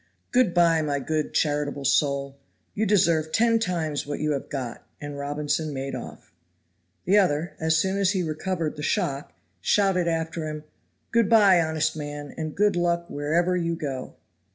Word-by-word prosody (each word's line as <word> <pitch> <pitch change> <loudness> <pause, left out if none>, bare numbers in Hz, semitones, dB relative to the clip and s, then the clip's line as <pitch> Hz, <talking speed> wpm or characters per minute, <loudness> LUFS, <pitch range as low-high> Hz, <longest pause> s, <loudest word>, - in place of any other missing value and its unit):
"Good 245 -8 +3
by, 165 -2 +4
my 145 -2 -1
good, 155 +2 -2
charitable 145 -2 -1
soul; 140 0 +1 0.3
you 220 +1 0
deserve 165 -6 +3
ten 230 +2 +3
times 165 -9 -2
what 145 - -3
you 155 0 0
have 140 - -3
got," 125 -4 -5 0.2
and 145 -1 -6
Robinson 145 +1 -2
made 135 +1 -4
off. - - -9 0.7
The 200 +4 +5
other, 170 -3 +1
as 160 0 +2
soon 190 +3 0
as 195 -2 +3
he 185 -2 0
recovered 160 0 -3
the - - -5
shock, 140 - -1 0.3
shouted 190 - +2
after 165 -1 -2
him, 155 0 -6 0.5
"Good 230 -3 +3
by, 200 -6 +6
honest 160 -1 0
man, 145 -1 -6
and 155 -1 -5
good 205 0 +3
luck 170 0 0
wherever 170 +5 +1
you 170 -1 -1
go." 135 -5 -5
160 Hz, 165 wpm, -25 LUFS, 145-180 Hz, 0.7 s, by